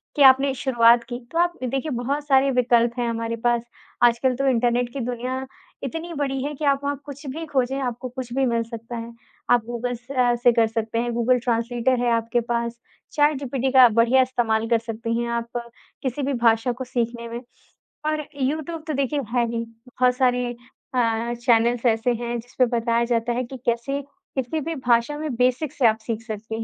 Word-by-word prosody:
कि 290 - 0
आपने 270 +1 -1
शुरुआत 240 -2 +4
की। 240 -1 -4
तो 335 - -3
आप 345 0 +3
देखिए 270 +4 -2
बहुत 280 +4 -2
सारे 275 -1 +4
विकल्प 240 -1 +2
हैं 240 - 0
हमारे 230 0 -2
पास, 240 -1 +2 0.4
आजकल 240 +2 +4
तो 275 +2 0
इंटरनेट 245 0 +1
की 275 - -4
दुनिया 250 +2 -3 0.4
इतनी 325 +5 -5
बड़ी 275 -3 -2
है 290 +1 -3
कि 300 - -4
आप 280 -1 +3
वहाँ 285 0 -1
कुछ 285 0 -9
भी 315 +5 -5
खोजें, 270 -2 0
आपको 250 0 -3
कुछ 250 -1 -7
भी 270 +1 +2
मिल 235 -2 +1
सकता 230 +1 -7
है। 230 0 -7 0.4
आप 245 -2 +5
गूगल 240 +1 -3
से 245 +4 -10
अ, 245 -1 +3
से 240 0 +4
कर 230 -1 +3
सकते 225 0 -2
हैं, 240 0 -1
गूगल 240 +2 +2
ट्रांसलेटर 240 +1 0
है 240 -1 +1
आपके 230 +1 0
पास, 235 0 -2 0.3
चैटजीपीटी 275 -3 +1
का 255 -2 +8
बढ़िया 230 +4 +4
इस्तेमाल 230 -3 0
कर 230 -1 +3
सकती 230 0 -3
हैं 235 - -2
आप 235 0 -2 0.5
किसी 260 +2 -2
भी 275 +1 0
भाषा 230 +2 +4
को 250 +2 -5
सीखने 235 -1 -3
में। 235 +1 -5 0.7
और 310 -1 -1 0.2
यूट्यूब 310 +4 -2
तो 310 - -1
देखिए 280 +1 0 0.2
है 240 -1 +3
ही 230 0 -2 0.2
बहुत 250 0 +1
सारे 250 -1 +2 0.5
अ, 230 -1 +1
चैनल्स 235 +1 +3
ऐसे 225 +1 +2
हैं 240 0 -3
जिस 245 +2 -14
पे 255 - +7
बताया 230 0 +1
जाता 235 0 +1
है 250 +2 -1
कि 265 +2 -8
कैसे 240 +4 0 0.3
किसी 265 +4 -1
भी 330 +3 -3
भाषा 245 +1 +1
में 305 -3 -3
बेसिक 255 +4 +1
से 260 - +1
आप 220 - +3
सीख 225 0 -4
सकती 220 0 -5
245 Hz, 200 wpm, -23 LUFS, 235-265 Hz, 0.7 s, का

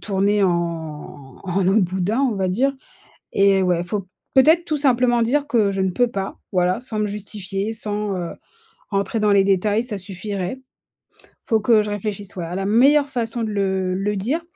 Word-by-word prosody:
Tourner 200 0 +1
en 160 -6 -3
en 185 0 0
eau 195 - +3
de 220 - +5
boudin, 190 +6 0
on 255 -6 +1
va 190 -1 0
dire, 265 +9 +1 0.6
et 195 -1 +4
ouais, 175 -2 +1
faut 190 +1 -4 0.3
peut-être 315 +6 +6
tout 310 -3 -2
simplement 250 -4 +3
dire 285 +5 0
que 210 -4 +2
je 195 - -1
ne 190 - +1
peux 245 +7 +2
pas, 195 -4 -5 0.2
voilà, 180 +2 +2
sans 220 -4 -5
me 210 - +1
justifier, 205 0 -4
sans, 210 -2 -3
heu, 175 -2 -4 0.6
rentrer 200 +2 -1
dans 210 -1 +3
les 195 -1 +5
détails, 205 +4 +2
ça 220 -5 -3
suffirait. 195 +4 -5 0.9
Faut 225 -2 +2
que 215 -1 +4
je 210 - -5
réfléchisse, 205 -1 -4
ouais, 175 -2 -4
à 170 - -6
la 195 - -2
meilleure 275 +7 +4
façon 235 -2 -2
de 220 - -2
le 190 -2 0
le 205 +2 -1
dire, 255 - -1
205 Hz, 190 wpm, -21 LUFS, 190-230 Hz, 0.9 s, peut-être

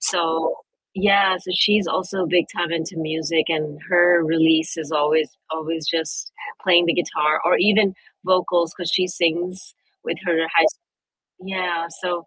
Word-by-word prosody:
So 165 -3 0 0.4
Yeah, 200 -1 +3
so 180 - -8
she's 210 +1 +3
also 185 +1 -2
big 175 +1 +2
time 175 -2 -2
into 165 +2 -4
music, 160 0 -1
and 155 -2 -3
her 175 -1 +5
release 160 0 +2
is 160 -2 -6
always 150 +1 +1 0.2
always 160 0 -4
just 160 -1 -2 0.3
playing 175 -2 +4
the 170 - +2
guitar 155 -3 0
or 175 - +4
even 205 -1 +3 0.3
vocals 180 -2 +1
'cause 175 -3 -4
she 185 - +2
sings 180 +1 -1 0.3
with - - -4
her 165 -2 +1
high 165 - +6
s 155 - 0 0.7
Yeah, 180 -3 -3 0.2
so 175 -2 -3
170 Hz, 150 wpm, -21 LUFS, 160-185 Hz, 0.7 s, high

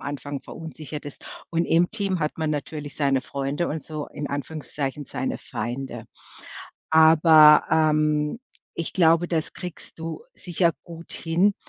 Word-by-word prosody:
Anfang 145 0 -5
verunsichert 155 -2 -8
ist. 145 - -10 0.3
Und 170 0 0
im 175 +2 +3
Team 200 -4 -1
hat 150 -1 -2
man 160 -1 0
natürlich 145 0 -5
seine 140 -3 +2
Freunde 140 +5 -3
und 155 0 -4
so, 155 -2 -6
in 145 - -6
Anführungszeichen, 145 -1 -4
seine - - -3
Feinde. 125 +4 -5 0.8
Aber, 160 -1 +7
ähm, 155 +1 +2 0.4
ich 170 - -4
glaube, 170 -1 +4
das 165 -2 -2
kriegst 180 -2 -9
du 160 -1 -6
sicher 175 -1 0
gut 170 0 -11
hin, 175 +5 +1
155 Hz, 140 wpm, -24 LUFS, 145-165 Hz, 0.8 s, Aber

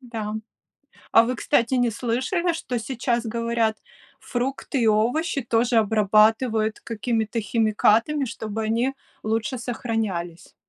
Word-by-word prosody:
Да. 225 -4 -5 0.8
А 225 - +8
вы, 250 +1 -2
кстати, 240 -1 +1
не 245 -2 +2
слышали, 260 - -1
что 255 -7 -3
сейчас 240 0 -2
говорят? 230 -1 0 0.4
Фрукты 265 +2 -3
и - - +3
овощи 245 +9 +1
тоже 235 +1 +1
обрабатывают 220 +1 +3
какими-то 225 0 -2
химикатами, 225 +6 +2
чтобы 220 -2 -5
они 235 +5 0 0.3
лучше 225 +3 -1
сохранялись? 220 -8 -4
230 Hz, 110 wpm, -24 LUFS, 220-245 Hz, 0.8 s, А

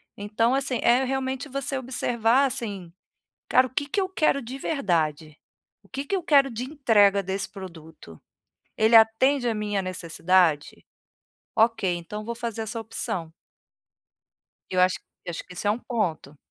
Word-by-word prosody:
Então 220 +4 0
assim, 270 -2 0
é 245 +3 +4
realmente 265 +1 -3
você 275 +1 -2
observar, 245 0 +1
assim: 200 -9 -4 0.6
"Cara, 255 - +5
o - - -7
que 285 +2 -1
que 400 - 0
eu 380 - 0
quero 315 -6 +1
de 255 +3 -8
verdade? 160 - -1 0.5
O - - -25
que 275 +2 -5
que 395 - -1
eu 380 - -1
quero 280 -4 +4
de 230 +2 -4
entrega 215 -9 +3
desse 195 +2 -3
produto? 165 - -12 0.5
Ele 220 +1 +4
atende 245 +4 +4
a 230 - +1
minha 205 -2 -2
necessidade? 175 -3 +1 0.7
Ok, 225 -3 +2
então 210 +5 -7
vou 235 +1 -4
fazer 230 -2 -4
essa 220 +1 -5
opção". 220 -7 -4 1.4
Eu 185 -1 0
acho 185 0 +3 0.3
acho 170 - -5
que - - -12
isso 180 - -5
é - - +4
um 215 - 0
ponto. 175 - -3
225 Hz, 155 wpm, -25 LUFS, 185-260 Hz, 1.4 s, Cara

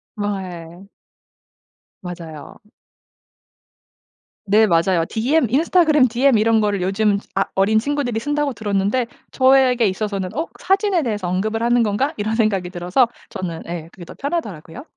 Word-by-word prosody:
아예. 190 -3 -6 1.1
맞아요. 170 -4 -9 1.9
네 215 +2 +4
맞아요. 170 -2 +2
디엠 255 +5 +1
인스타그램 310 0 +3
디엠 250 +1 +3
이런 220 +1 +3
걸 205 -2 0
요즘 200 +2 +1 0.2
아 195 - +2
어린 200 +3 +3
친구들이 245 -1 -1
쓴다고 290 +2 -1
들었는데 205 +2 0 0.3
저에게 260 -3 +4
있어서는 195 -1 -3
'어? 320 +3 -2
사진에 385 -2 +1
대해서 210 -7 -2
언급을 215 +5 -1
하는 240 0 +3
건가?' 230 +8 0
이런 215 +1 -1
생각이 200 -6 0
들어서 180 +8 +1 0.2
저는 180 -5 -5
예 170 -1 -6
그게 180 - -11
더 - - -11
편하더라고요. 255 - -5
215 Hz, 315 characters per minute, -20 LUFS, 190-255 Hz, 1.9 s, 네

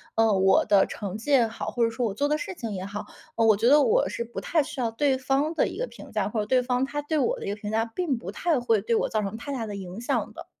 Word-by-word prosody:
呃， 225 -1 +4
我 190 0 +4
的 200 -2 +5
成 200 0 -5
绩 260 +7 -5
也 245 -4 +5
好， 225 - -6
或 240 - 0
者 230 - +3
说 235 +2 -2
我 210 - -1
做 285 +7 0
的 300 +1 +1
事 390 +2 -5
情 230 -9 -5
也 190 -1 -4
好， 200 +1 -6 0.3
嗯， 225 - +4
我 215 - +6
觉 225 +4 +1
得 295 +1 +7
我 485 +8 +3
是 235 - -3
不 235 - -6
太 325 - +2
需 270 - -8
要 230 -1 0
对 270 +2 +1
方 275 +4 0
的 - - +2
一 - - -7
个 - - -2
评 - - -13
价， 210 -2 0
或 220 - -2
者 210 - -1
对 255 +3 +3
方 250 +1 0
他 290 +1 -4
对 310 +2 -1
我 260 - +1
的 - - -6
一 - - -3
个 205 - -2
评 210 0 -6
价 225 +1 +1
并 270 +3 -2
不 190 -3 -7
太 315 +5 0
会 230 -4 +2
对 230 +2 0
我 - - +1
造 215 -1 0
成 200 +2 -4
太 285 +4 -6
大 235 -4 -3
的 205 - -6
影 190 +1 -7
响 - - -1
的。 - - -9
230 Hz, 340 characters per minute, -26 LUFS, 210-275 Hz, 0.3 s, 得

